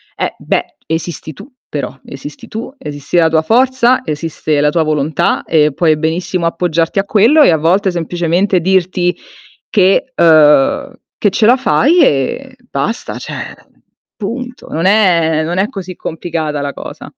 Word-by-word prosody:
Eh - - -3
beh, - - -2
esisti 160 -1 -4
tu 260 - -13 0.2
però, 145 -2 -5
esisti 140 +2 -10
tu, 235 +4 -7
esisti 145 - -4
la 165 - +5
tua 160 -1 +2
forza, 255 +4 +3
esiste 155 -1 -2
la 150 - +3
tua 165 +1 +1
volontà 155 -1 0
e 150 -3 +2
puoi 160 -1 +2
benissimo 170 +3 -2
appoggiarti 165 +1 0
a 195 - 0
quello 230 +10 +4
e - - +5
a 160 - +3
volte 185 +5 +1
semplicemente 175 +2 0
dirti 180 0 +1 0.5
che 195 +5 +2
uhm, 150 -4 +4 0.2
che 205 - +2
ce 215 - +1
la 245 +3 +5
fai 310 +6 +3
e 200 - -1
basta, 225 +3 -3
cioè - - -7 0.6
punto. 245 +4 -6
Non 165 +3 -2
è 170 -6 +3
non 175 +3 -3
è 200 - +2
così 185 -2 -7
complicata 160 -3 -4
la 140 0 -4
cosa. - - -9
170 Hz, 155 wpm, -14 LUFS, 155-205 Hz, 0.6 s, la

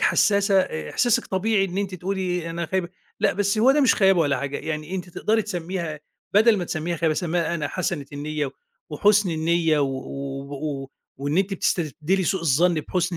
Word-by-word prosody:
حساسة، 200 -2 +3
إحساسِك 130 - 0
طبيعي 195 +1 +1
إن 190 0 -4
أنتِ 200 -2 -2
تقولي 180 -2 -2
"أنا 170 0 -3
خايبة" 185 +1 -1 0.3
لأ، - - +3
بس 200 +2 0
هو 240 +5 +6
ده 295 - +3
مش 265 - +5
خيابة 190 -3 +4
ولا 145 -3 +2
حاجة. 140 0 -3
يعني 155 +2 -4
أنتِ 180 -1 -4
تقدري 220 +5 0
تسميها 175 -5 -4 0.3
بدل 220 +1 +6
ما 180 - -2
تسميها 170 +1 -3
خيابة، 160 -1 +1
سمّيها 170 0 -1
"أنا 150 -4 -2
حسنة 165 -6 -3
النيّة" 150 -1 -3 0.4
وحُسن 200 +4 +3
النيّة 160 0 +1
و 140 - +2 0.7
و 140 -2 -4 0.3
وإن 145 +5 -1
أنتِ 195 +1 +1
بتستبدلي 170 +1 0
سوء 190 +2 0
الظن 165 +3 +3
بحسن 175 +3 -1
175 Hz, 175 wpm, -24 LUFS, 155-195 Hz, 0.7 s, هو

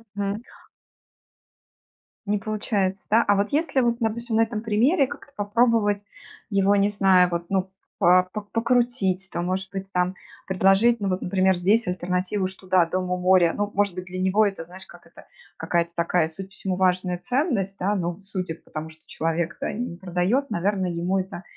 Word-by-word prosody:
Мгм. 200 +1 -2 1.8
Не 210 0 +1
получается, 200 -2 -2
да? 225 +2 +5
А 205 - +4
вот 200 +1 0
если, 295 -2 +1
вот 235 -1 +1
допустим, 230 0 -2
на 225 - +4
этом 225 -1 -1
примере 245 - +2
как-то 285 - -10
попробовать 205 -1 +1 0.4
его, 200 -1 +3
не 200 0 +3
знаю, 190 -3 +4
вот, 170 0 -2
ну, 190 -1 -1 0.3
по 180 +1 +5
п 210 - -4
покрутить, 230 -5 +1
там, 175 0 -3
может 190 +1 -2
быть, 195 0 -5
там 180 0 0 0.3
предложить, 195 +5 +3
ну 200 - 0
вот, 185 0 -1
например, 190 0 +2
здесь 205 +6 +2
альтернативу: 180 +2 -1
что 190 0 -12
да, 185 -2 +4
дом 185 +2 -2
у 180 - +1
моря, 180 -2 +4
ну, 205 0 -1
может 200 -1 +1
быть, 185 +1 -6
для 185 0 -6
него 195 +3 +3
это, 195 -5 -3
знаешь, 180 +3 -12
как - - -16
это - - -16 0.3
какая-то 170 -1 0
такая, 170 -1 +1
судя 190 +4 -7
по 195 - -23
всему, 190 -2 -3
важная 185 -1 +1
ценность, 245 - -1
да. 200 +3 0
Ну, 175 -1 -3
судя 185 -4 -4
по - - -24
тому, 155 +1 -5
что 160 0 -18
человек-то, 165 +2 -2
э, - - -3
не 225 -6 -4
продает, 185 +9 0
наверное, 190 -2 0
ему 175 +3 0
это 185 -1 -6
195 Hz, 185 wpm, -24 LUFS, 180-210 Hz, 1.8 s, да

